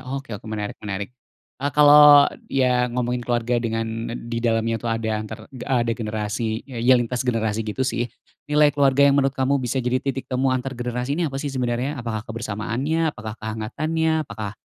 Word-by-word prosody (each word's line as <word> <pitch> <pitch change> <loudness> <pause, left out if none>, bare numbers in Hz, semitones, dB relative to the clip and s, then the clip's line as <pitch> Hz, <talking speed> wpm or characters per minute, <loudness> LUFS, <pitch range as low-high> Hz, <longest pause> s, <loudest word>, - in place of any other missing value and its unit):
Oke 135 -3 -5
oke 105 +2 -8
menarik 105 -1 -5
menarik. 100 +2 -5 0.5
Eee, 145 +1 0
kalau 145 -1 +9 0.2
ya 125 -2 +2
ngomongin 125 0 -1
keluarga 120 0 0
dengan 115 -1 -1 0.2
n 115 - -6
di 115 - -1
dalamnya 115 -1 0
tuh 120 - -3
ada 110 -1 -1
antar 110 - -7
de 125 - -8
a 125 -3 +2
degenerasi 110 -1 -2
ya 125 -4 -7
yang 120 0 +4
lintas 125 +1 -3
generasi 110 -2 0
gitu 110 +4 -2
sih, 120 -2 -1 0.4
nilai 150 -1 +4
keluarga 140 -1 +4
yang 140 0 +5
menurut 135 0 0
kamu 135 +1 +1
bisa 125 +1 -2
jadi 125 +1 +1
titik 135 -1 -4
temu 130 +1 +1
antar 130 +1 -1
generasi 125 +2 -3
ini 165 0 0
apa 135 - -6
sih 140 0 -3
sebenarnya? 125 +2 -2
Apakah 110 -2 -4
kebersamaannya? 120 +8 -2
Apakah 110 +1 -7
kehangatannya? 155 +9 -1
Apakah 105 -4 -6
125 Hz, 185 wpm, -23 LUFS, 115-135 Hz, 0.5 s, kalau